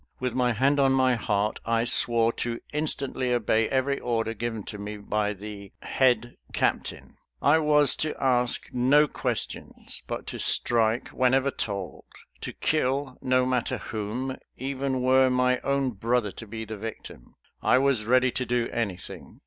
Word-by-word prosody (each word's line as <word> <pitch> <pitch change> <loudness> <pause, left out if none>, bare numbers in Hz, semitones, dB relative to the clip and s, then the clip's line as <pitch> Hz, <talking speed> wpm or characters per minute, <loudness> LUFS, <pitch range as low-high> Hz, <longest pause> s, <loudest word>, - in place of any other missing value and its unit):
With 125 -2 -2
my 125 -1 +1
hand 135 +5 +2
on 135 -1 +4
my 130 -1 +3
heart 105 -2 -1
I 115 0 +1
swore 115 -1 +3
to 120 -1 -3
instantly 140 -4 -1
obey 115 -2 +1
every 135 +1 0
order 115 -2 -1
given 115 -1 -4
to 105 - -7
me 105 +1 -6
by 105 0 -1
the 100 0 -9
"head 120 -2 +1 0.2
captain." - - -2 0.2
I 145 +3 +4
was 150 -2 +4
to 155 -1 -1
ask 125 -2 +2
no 135 +5 +4
questions, - - -4
but - - -5
to - - -6
strike, 115 0 +2
whenever 130 +2 +2
told; 100 -9 -4 0.3
to - - -5
kill, 135 -3 -1
no 130 0 +2
matter 125 -2 0
whom, 115 +5 -4 0.2
even 135 0 -2
were 130 0 +5
my 125 0 +2
own 140 -1 0
brother 115 0 0
to 115 - -10
be 110 +2 -6
the 110 0 -7
victim. 110 - -9 0.3
I - - +4
was 130 -5 +2
ready 130 +2 +3
to 130 - -1
do 120 -1 -1
anything. 100 -7 -5
125 Hz, 155 wpm, -26 LUFS, 110-130 Hz, 0.3 s, were